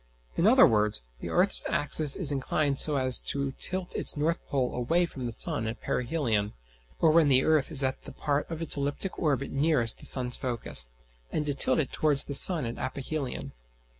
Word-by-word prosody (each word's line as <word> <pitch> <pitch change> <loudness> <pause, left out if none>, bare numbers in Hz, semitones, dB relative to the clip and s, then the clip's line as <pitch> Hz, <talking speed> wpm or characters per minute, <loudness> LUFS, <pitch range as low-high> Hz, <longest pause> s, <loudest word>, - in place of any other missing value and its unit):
In - - +1
other - - +6
words, 105 - 0 0.2
the - - -8
earth's - - +3
axis 150 -1 +1
is 165 -7 +3
inclined 140 +1 -2
so 150 - +3
as 130 -2 +3
to 140 -1 -4
tilt 185 0 -2
its - - -1
north 160 +3 -2
pole 130 -3 -3
away 165 +9 -1
from 130 -7 -8
the - - -6
sun 110 0 -1
at 110 - -7
perihelion, 120 -7 -3 0.5
or 160 - +3
when 160 -1 +3
the 130 -2 +3
earth 155 -1 0
is 140 -3 +6
at 130 0 -4
the - - -10
part 145 -1 -4
of 165 0 -6
its 165 - +2
elliptic 145 +6 -5
orbit 140 -4 -2
nearest 135 -5 0
the - - -2
sun's 125 -2 +3
focus; 115 - +1 0.4
and 150 - -3
to 145 - -2
tilt 130 - +1
it 150 -5 -2
towards 145 -3 +1
the 140 - -8
sun 155 +1 +7
at 115 +1 -7
aphelion. 135 +1 -6
140 Hz, 195 wpm, -26 LUFS, 125-155 Hz, 0.5 s, sun